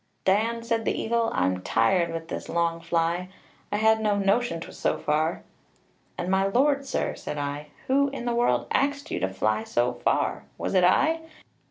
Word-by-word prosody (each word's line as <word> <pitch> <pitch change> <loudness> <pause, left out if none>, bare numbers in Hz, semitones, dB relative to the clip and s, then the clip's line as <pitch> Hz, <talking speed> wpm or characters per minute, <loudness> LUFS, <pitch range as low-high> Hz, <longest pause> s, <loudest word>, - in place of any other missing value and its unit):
"'Dan,' 225 +4 +2
said 230 -1 0
the - - -1
eagle, 230 0 +1
'I'm 90 0 0
tired 170 - +2
with 165 0 -5
this - - -6
long 170 0 0
fly; 170 +2 0 0.4
I 205 - +1
had 220 +1 +3
no 210 -2 +2
notion 200 -1 +1
'twas 165 - -9
so - - +1
far.' 155 +2 0 0.7
'And 175 - -3
my 195 0 +3
lord, 275 +6 +2
sir,' - - -1
said 150 - -6
I, 145 +1 -4 0.2
'who 280 +2 +3
in 270 -3 -6
the 240 - 0
world 240 +1 +2
axed 285 +1 0
you - - -1
to 95 - 0
fly 110 +3 0
so 120 +2 0
far - - 0
was - - -3
it 185 -2 +4
I? 315 - +4
190 Hz, 185 wpm, -26 LUFS, 165-235 Hz, 0.7 s, it